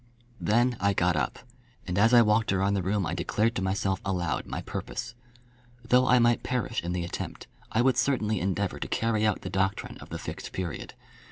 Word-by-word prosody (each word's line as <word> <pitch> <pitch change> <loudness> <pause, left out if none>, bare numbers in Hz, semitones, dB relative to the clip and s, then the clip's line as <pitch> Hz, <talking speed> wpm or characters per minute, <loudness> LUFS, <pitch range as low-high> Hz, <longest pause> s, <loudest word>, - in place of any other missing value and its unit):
Then 120 +3 +2
I 100 +1 +2
got 90 -2 +2
up, 65 -5 -1 0.5
and 90 - -3
as 110 +4 +4
I 120 -1 +8
walked 105 0 +2
about 95 +1 +2
the 100 - +1
room 95 +1 0
I 85 - -2
declared 105 +6 0
to 95 - -2
myself 95 0 0
aloud 90 -4 -1
my - - -4
purpose. 120 - -5 0.7
Though 125 +2 +4
I 125 - +6
might 120 -1 +3
perish 125 -2 -1
in 85 +1 -3
the 90 -1 -1
attempt, 85 - -6 0.3
I 115 - +2
would 130 -2 +3
certainly 115 -5 +1
endeavour 95 +1 -1
to - - -3
carry 110 -1 +1
out 105 - 0
the 95 - -6
doctrine 95 0 -1
of - - -12
the - - -4
Fixed - - -7
Period. 90 -4 -5
100 Hz, 200 wpm, -28 LUFS, 95-115 Hz, 0.7 s, I